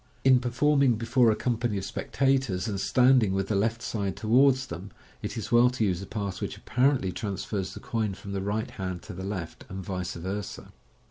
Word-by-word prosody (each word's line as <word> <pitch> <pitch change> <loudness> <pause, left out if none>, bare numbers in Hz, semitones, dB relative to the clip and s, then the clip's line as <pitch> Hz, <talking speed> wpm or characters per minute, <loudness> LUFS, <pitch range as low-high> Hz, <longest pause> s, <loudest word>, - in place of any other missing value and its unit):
In 130 -1 +6
performing 130 +1 +3
before 115 +2 +3
a 110 - +3
company 120 -3 -1
of 95 - -3
spectators, 130 -8 0
and 100 -3 -2
standing 125 -5 +4
with 95 0 -1
the 105 - +1
left 115 +4 0
side 100 -4 -2
towards 130 +4 +4
them, 95 -3 -7 0.3
it - - -4
is 110 - -5
well 120 +1 +6
to 125 -3 0
use 95 -2 0
a 95 - -7
pass 100 -3 -4
which - - -4
apparently 125 -5 +1
trans 100 +2 -4
fers 95 -3 -3
the - - -7
coin 110 -4 -2
from 100 +1 -9
the 100 -1 -2
right 105 +3 -2
hand 95 -2 -5
to - - -8
the 95 +2 -6
left, 95 -4 -5
and 95 -1 -6
vice 90 -2 -3
versa. 95 +4 -5
105 Hz, 205 wpm, -27 LUFS, 95-125 Hz, 0.3 s, In